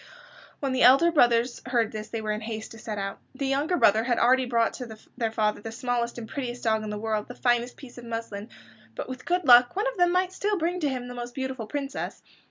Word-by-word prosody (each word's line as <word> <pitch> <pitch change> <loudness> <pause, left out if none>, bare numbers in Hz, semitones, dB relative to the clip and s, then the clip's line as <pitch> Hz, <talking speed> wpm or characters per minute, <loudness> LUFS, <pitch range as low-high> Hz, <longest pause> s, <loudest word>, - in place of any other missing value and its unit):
When 275 -2 -1
the 260 0 0
elder 275 +8 +7
brothers 240 -5 +3
heard 235 -3 +1
this 215 0 -6
they 225 - -4
were 215 -1 -2
in 210 +1 -3
haste 220 0 -6
to 225 - -11
set 215 -1 -5
out. 195 0 -4 0.2
The 275 - -3
youngest 285 +6 +1
brother 215 +2 +5
had 240 -2 +1
already 255 +1 +4
brought 230 -2 +2
to 225 -3 -7 0.2
their 230 -3 -1
father 215 -2 0
the 225 - -6
smallest 240 0 -2
and 230 -2 -6
prettiest 245 -3 -5
dog 220 -1 +1
in 215 - -5
the 210 - -4
world, 215 0 -2
and 245 - -9
the - - -26
finest 240 0 +1
piece 250 -3 -11
of 240 - -11
muslin, 225 -2 -5 0.5
but - - -5
with 255 -1 -8
good 355 0 0
luck 245 +4 +7
one 410 - 0
of - - -2
them 355 -1 +4
might 365 +1 +1
still 410 +2 0
bring 350 +2 -1
to 300 -4 0
him 250 -2 -4
the 245 - -7
most 240 0 -7
beautiful 265 -4 -4
princess. 275 +3 -4
245 Hz, 250 wpm, -26 LUFS, 225-270 Hz, 0.5 s, elder